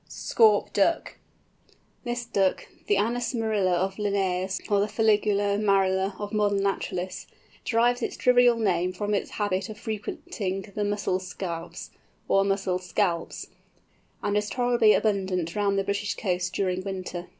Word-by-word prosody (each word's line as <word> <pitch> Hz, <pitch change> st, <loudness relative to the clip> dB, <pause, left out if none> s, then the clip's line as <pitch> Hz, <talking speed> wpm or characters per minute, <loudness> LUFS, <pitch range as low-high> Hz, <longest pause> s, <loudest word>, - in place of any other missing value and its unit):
SCAUP 215 Hz, -3 st, +2 dB
DUCK. 205 Hz, +12 st, +1 dB, 0.8 s
This 240 Hz, -1 st, -3 dB
Duck, 195 Hz, -4 st, 0 dB, 0.2 s
the 205 Hz, -, +3 dB
Anas 235 Hz, +4 st, 0 dB
marila 215 Hz, -5 st, +1 dB
of 190 Hz, +2 st, -1 dB
Linnæus, 190 Hz, -2 st, -1 dB
or 205 Hz, 0 st, +3 dB
Fuligula 205 Hz, -2 st, +2 dB
marila 195 Hz, -1 st, +2 dB
of 205 Hz, +1 st, -5 dB
modern 205 Hz, -2 st, +1 dB
naturalists, 185 Hz, -2 st, -3 dB, 0.4 s
derives 240 Hz, +1 st, +2 dB
its -, -, -3 dB
trivial 245 Hz, -1 st, +5 dB
name 185 Hz, -4 st, +1 dB
from 205 Hz, +3 st, -2 dB
its 200 Hz, -, -1 dB
habit 205 Hz, 0 st, -2 dB
of 215 Hz, -, -8 dB
frequenting 205 Hz, -3 st, -4 dB
the 210 Hz, -, -1 dB
"mussel 205 Hz, -2 st, 0 dB
scaups," 175 Hz, -2 st, -6 dB, 0.4 s
or 195 Hz, -, +4 dB
"mussel 195 Hz, -2 st, 0 dB
scalps," 180 Hz, -2 st, -2 dB, 0.7 s
and 205 Hz, 0 st, 0 dB
is 210 Hz, 0 st, 0 dB
tolerably 240 Hz, -3 st, +3 dB
abundant 190 Hz, -5 st, 0 dB
round 200 Hz, -1 st, +1 dB
the 195 Hz, -, +1 dB
British 200 Hz, +1 st, -2 dB
coasts 180 Hz, -3 st, -1 dB
during 185 Hz, 0 st, -1 dB
winter. 185 Hz, -2 st, -5 dB
200 Hz, 140 wpm, -26 LUFS, 185-210 Hz, 0.8 s, trivial